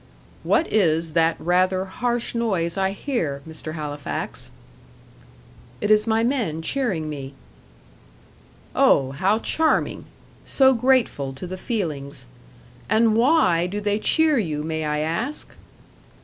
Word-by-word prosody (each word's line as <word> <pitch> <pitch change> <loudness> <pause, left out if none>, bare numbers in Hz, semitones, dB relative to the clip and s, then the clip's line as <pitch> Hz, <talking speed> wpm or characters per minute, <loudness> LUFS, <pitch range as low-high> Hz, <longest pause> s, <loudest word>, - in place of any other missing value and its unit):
"What 325 - +2
is 165 -5 +2
that 165 0 +3
rather 185 +2 +1
harsh 240 +4 -2
noise 190 -8 -1
I 190 -1 +1
hear, 190 - -3
Mr. 160 0 -7
Halifax?" 145 -2 -5 1.3
"It 210 - 0
is 215 +1 +4
my 225 0 +2
men 230 - -1
cheering 195 - -1
me." 140 -2 -7 1.4
"Oh, 135 -1 +4
how 190 +9 +1
charming! 315 +7 0 0.4
so 265 -1 +4
grateful 235 - +1
to 135 +7 -8
the 185 +1 -5
feelings. 150 - -4 0.6
And 220 0 +3
WHY 230 - +3
do 200 +3 -4
they 205 0 0
cheer 310 +3 +3
you, 155 -7 -2
may 160 0 -3
I 150 0 -1
ask?" 220 - -4
185 Hz, 120 wpm, -23 LUFS, 155-230 Hz, 1.4 s, is